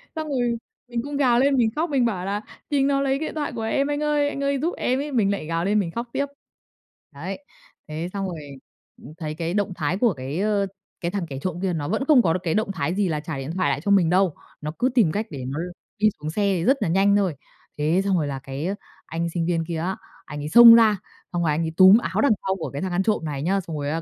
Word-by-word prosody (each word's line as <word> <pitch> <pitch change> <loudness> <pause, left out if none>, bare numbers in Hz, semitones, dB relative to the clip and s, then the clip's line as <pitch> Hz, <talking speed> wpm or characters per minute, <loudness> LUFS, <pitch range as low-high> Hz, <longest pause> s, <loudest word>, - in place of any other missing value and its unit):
xong 315 -1 -3
rồi 245 -4 0 0.3
mình 240 -1 -2
cũng 285 0 -4
gào 245 -4 +3
lên 275 +1 +3
mình 230 -2 +3
khóc, 320 +2 0
mình 265 -4 +2
bảo 185 -6 -1
là 205 +2 -2 0.3
"Chính 275 -2 +2
nó 275 -1 +2
lấy 275 0 +1
điện 315 +1 -4
thoại 300 -1 -2
của 225 - -4
em 275 +5 0
anh 290 0 -2
ơi! 295 -1 +2
Anh 280 -1 -4
ơi 280 -1 +1
giúp 335 +5 -1
em!" 255 +2 0
ấy, 295 +1 -4
mình 215 -6 +2
lại 200 -6 -3
gào 165 +1 -1
lên 210 +2 +2
mình 170 -5 -2
khóc 235 +4 -4
tiếp. 280 - 0 0.9
Đấy, 190 - -7 0.4
thế 160 +3 -4
xong 195 -1 -2
rồi, 170 -3 -5 0.6
ừm, 155 - -11
thấy 155 -3 -4
cái 170 +1 -3
động 205 -2 0
thái 155 +3 -1
của 225 -2 +3
cái, 135 +5 -5
ơ, 205 -1 +1 0.3
cái 170 - -2
thằng 195 -2 -2
kẻ 135 -1 -5
trộm 180 -2 -3
kia 190 -2 0
nó 145 -3 -3
vẫn 220 - -1
không 290 -5 +7
có 165 -7 +2
được 185 - -1
cái 165 -3 0
động 215 -1 0
thái 175 0 -2
gì 205 -1 +1
là 155 - -1
trả 155 -1 -5
điện 135 +3 -5
thoại 185 -6 +1
lại 140 +1 -1
cho 200 - +1
mình 180 -5 +4
đâu. 185 -2 +2 0.3
Nó 150 0 -3
cứ 250 +2 +3
tìm 205 -10 +4
cách 215 +6 -2
để 135 -5 -6
nó 140 +4 -4
l 175 - -3 0.3
đi 215 0 +5
xuống 150 +1 -4
xe 205 - -2 0.2
thì 165 - -2
rất 270 +2 +4
là - - +1
nhanh 195 +3 +4
thôi. 195 -6 +1 0.4
Thế 155 +5 +2
xong 195 -2 +2
rồi 150 -3 0
là 135 -1 -4
cái 135 +3 -6
á 195 - -1 0.3
anh 165 +1 -3
sinh 170 -2 -1
viên 165 -1 0
kia 170 -2 -3
á, 180 +4 -2 0.3
anh 145 -1 -7
ấy 150 - -4
xông 235 +3 +10
ra, 220 -3 +5 0.4
xong 175 - 0
rồi 160 - +2
anh 150 +3 0
ấy 160 - -2
túm 190 +3 +9
áo - - -1
đằng 285 - +4 0.2
sau 190 - +1
của 170 - -5
cái 140 - -4
thằng 190 -1 -2
ăn 180 +2 +1
trộm 210 -6 0
này 140 -2 -3
nhá, 195 +4 +1
xong 165 -3 -6
rồi 145 0 -2
á 165 +2 -2
190 Hz, 285 wpm, -24 LUFS, 165-235 Hz, 0.9 s, xông